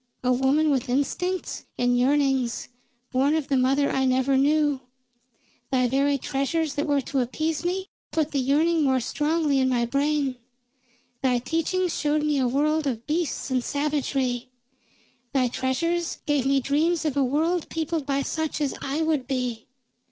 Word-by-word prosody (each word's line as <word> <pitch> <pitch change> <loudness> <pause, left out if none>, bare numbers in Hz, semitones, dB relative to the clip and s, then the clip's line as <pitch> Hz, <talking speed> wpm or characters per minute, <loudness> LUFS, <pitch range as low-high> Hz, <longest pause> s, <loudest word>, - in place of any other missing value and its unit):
A 250 0 +3
woman 275 +4 +2
with 260 -3 0
instincts 355 +8 -1
and 245 0 +2
yearnings, 265 -1 +1 0.4
born 275 +4 +2
of 315 -3 -2
the 275 - +2
mother 270 +2 +2
I 265 - +1
never 260 +1 +2
knew. 290 0 +2 0.9
Thy 255 -2 +3
very 280 +3 +2
treasures 280 +3 -1
that 290 +2 -2
were 285 -1 +2
to 270 +1 -2
appease 310 +6 -1
me 370 +2 -1 0.2
put 315 -2 -1
the 280 - 0
yearning 310 +5 +2
more 265 -3 +3
strongly 295 +3 0
in 260 0 +2
my 240 -2 +1
brain. 280 +1 0 0.8
Thy 255 -2 +2
teachings 330 +7 -1
showed 300 0 +1
me 300 -2 +1
a 255 - +2
world 300 +4 +1
of 240 -3 -3
beasts 310 -3 -2
and 255 -1 +1
savagery; 270 -4 -1 0.8
thy 260 -2 +3
treasures 335 +8 -1
gave 290 -3 +1
me 275 0 +3
dreams 315 +5 +1
of 295 -3 0
a 280 - +3
world 315 +6 0
peopled 320 -2 -2
by 275 0 0
such 315 0 -2
as 290 -2 0
I 285 +4 -1
would 310 -5 0
be. 250 -4 -3
280 Hz, 160 wpm, -25 LUFS, 260-310 Hz, 0.9 s, A